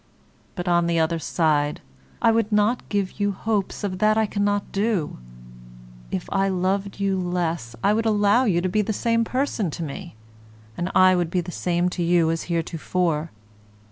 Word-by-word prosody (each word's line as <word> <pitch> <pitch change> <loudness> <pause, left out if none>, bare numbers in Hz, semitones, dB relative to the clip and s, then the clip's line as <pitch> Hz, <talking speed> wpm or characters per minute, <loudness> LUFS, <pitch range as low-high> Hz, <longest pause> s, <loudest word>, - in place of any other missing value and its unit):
But, 175 0 -5
on 175 -1 +3
the 170 0 +1
other 165 +1 +1
side, 150 -2 +1 0.4
I 230 - +6
would 225 -1 +1
not 210 +4 +1
give 200 -1 -2
you 205 0 +1
hopes 210 0 -2
of 185 -2 -3
that 215 +1 +3
I 220 - +3
cannot 205 -1 -1
do. 200 - -1 0.9
If 95 - -4
I 195 0 +2
loved 195 +2 -1
you 195 -1 0
less 170 -9 -2
I 205 - +4
would 225 +1 0
allow 210 +3 +3
you 175 -6 +2
to 185 - 0
be 210 +4 +1
the 215 +1 -2
same 230 +2 +1
person 250 -5 -1
to 165 - -5
me, 170 - -7 0.6
and 175 - -2
I 185 0 +6
would 175 -2 0
be 180 +1 0
the 175 +1 -7
same 175 0 0
to 180 - -4
you 170 -1 +3
as 165 - -3
heretofore. 165 -1 -1
185 Hz, 180 wpm, -23 LUFS, 170-205 Hz, 0.9 s, I